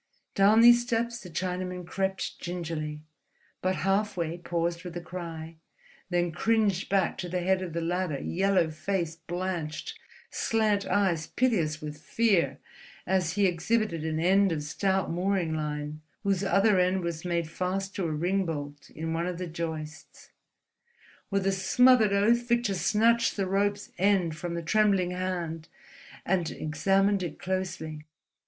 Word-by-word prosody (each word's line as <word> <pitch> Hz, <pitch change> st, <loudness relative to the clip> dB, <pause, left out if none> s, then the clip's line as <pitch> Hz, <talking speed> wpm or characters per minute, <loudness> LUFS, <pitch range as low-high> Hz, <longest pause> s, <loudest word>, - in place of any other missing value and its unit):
Down 205 Hz, +3 st, +5 dB
these 240 Hz, 0 st, +8 dB
steps 235 Hz, 0 st, -1 dB
the 180 Hz, -, -10 dB
Chinaman 180 Hz, +1 st, -3 dB
crept 190 Hz, +1 st, -2 dB
gingerly, 160 Hz, -4 st, -4 dB, 0.6 s
but 185 Hz, 0 st, +1 dB
halfway 195 Hz, -4 st, 0 dB
paused 170 Hz, 0 st, -2 dB
with 175 Hz, -1 st, -6 dB
a -, -, -2 dB
cry, 165 Hz, -2 st, -7 dB, 0.5 s
then 175 Hz, -1 st, +1 dB
cringed 205 Hz, +1 st, +1 dB
back 195 Hz, -3 st, +1 dB
to 180 Hz, -, -4 dB
the 180 Hz, +1 st, -1 dB
head 190 Hz, +1 st, +2 dB
of 180 Hz, -3 st, -5 dB
the 170 Hz, -, -2 dB
ladder, 175 Hz, -2 st, -1 dB
yellow 185 Hz, -1 st, +1 dB
face 170 Hz, 0 st, -2 dB
blanched, 175 Hz, -3 st, -4 dB, 0.3 s
slant 215 Hz, -3 st, +1 dB
eyes 180 Hz, -6 st, +1 dB
piteous 170 Hz, -12 st, 0 dB
with 150 Hz, 0 st, -6 dB
fear, 170 Hz, -, +1 dB, 0.5 s
as 180 Hz, -2 st, +1 dB
he 200 Hz, +1 st, +2 dB
exhibited 180 Hz, 0 st, 0 dB
an 160 Hz, 0 st, -1 dB
end 190 Hz, +3 st, +4 dB
of 150 Hz, -2 st, -2 dB
stout 190 Hz, +5 st, 0 dB
mooring 180 Hz, -1 st, 0 dB
line 150 Hz, 0 st, -4 dB, 0.2 s
whose 195 Hz, -2 st, +1 dB
other 195 Hz, 0 st, +3 dB
end 185 Hz, +1 st, +2 dB
was 170 Hz, -2 st, -3 dB
made 170 Hz, -2 st, -1 dB
fast 190 Hz, +4 st, -3 dB
to 190 Hz, -, -2 dB
a -, -, -2 dB
ring 180 Hz, +6 st, 0 dB
bolt 145 Hz, -2 st, -6 dB
in 160 Hz, +1 st, -4 dB
one 170 Hz, +2 st, -1 dB
of 180 Hz, -1 st, -3 dB
the 180 Hz, -, -4 dB
joists. 160 Hz, -2 st, -7 dB, 1.0 s
With 195 Hz, -1 st, 0 dB
a 195 Hz, -, +3 dB
smothered 220 Hz, +3 st, +4 dB
oath 230 Hz, +4 st, +3 dB
Victor 235 Hz, -3 st, +2 dB
snatched 220 Hz, +7 st, +2 dB
the 195 Hz, -, +1 dB
rope's 200 Hz, +2 st, 0 dB
end 185 Hz, -4 st, +2 dB
from 170 Hz, +2 st, -4 dB
the 170 Hz, -, -3 dB
trembling 195 Hz, -1 st, +2 dB
hand 175 Hz, -3 st, -3 dB, 0.6 s
and 175 Hz, -3 st, +1 dB
examined 195 Hz, +5 st, +1 dB
it 170 Hz, -4 st, -4 dB
closely. 160 Hz, -5 st, -4 dB
180 Hz, 150 wpm, -28 LUFS, 165-195 Hz, 1.0 s, these